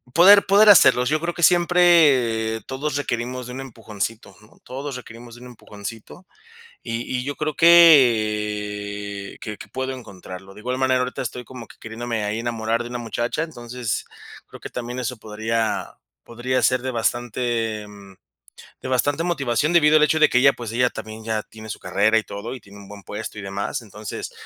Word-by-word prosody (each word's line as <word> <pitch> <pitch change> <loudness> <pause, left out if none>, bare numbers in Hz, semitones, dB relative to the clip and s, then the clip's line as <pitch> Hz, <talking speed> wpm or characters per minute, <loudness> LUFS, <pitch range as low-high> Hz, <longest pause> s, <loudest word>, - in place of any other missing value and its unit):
poder 200 +4 +7
poder 205 +2 +6
hacerlo. 125 -9 +6
Yo 155 +3 0
creo 170 +1 -3
que 175 - -7
siempre 150 -11 +4
todos 140 +2 -3
requerimos 125 -2 -3
de 125 - -8
un 130 - -6
empujoncito, 110 -4 -6
¿no? 105 - -21
Todos 135 +1 -6
requerimos 120 -1 -11
de 120 - -14
un 125 - -10
empujoncito, 115 - -10 0.6
y 115 0 -4 0.2
y 125 - -3
yo 145 0 -3
creo 155 -1 -3
que 105 -10 +3
que 105 -2 -6
que - - -11
puedo 130 0 -4
encontrarlo. 95 -5 -10
De - - -12
igual 125 +3 -3
manera, 130 -1 +2
ahorita 125 0 -3
estoy 125 +1 -6
como 125 -3 -10
que - - -17
queriéndome 115 0 -4
ahí 105 +2 -2
enamorar 115 0 -2
de 120 - -8
una 120 - -4
muchacha. 120 +5 -3
Entonces, 120 -6 -4 0.4
creo - - -13
que - - -8
también 125 +1 -6
eso 125 0 -3
podría 110 +1 -3 0.3
podría 125 +2 -2
ser 130 +2 +3
de 130 - -3
bastante, 115 -2 -2
em, 100 -2 -14 0.7
de - - -6
bastante 145 +5 0
motivación, 145 -2 0
debido 155 -2 +5
al 150 - +4
hecho 160 +1 +2
de 155 - +5
que - - +1
ella, 135 +2 +5
pues, 115 -2 -7
ella 125 +1 +1
también 110 0 -8
ya 110 -1 -2
tiene 110 0 -13
su - - -6
carrera 110 +3 +2
y - - -7
todo, 110 +5 -7
y 130 - -8
tiene 100 0 -15
un 100 -1 -13
buen 100 0 -11
puesto 105 +2 -7
y - - -6
demás. 100 +4 -4
Entonces, 105 -1 -8
120 Hz, 190 wpm, -22 LUFS, 110-130 Hz, 0.7 s, poder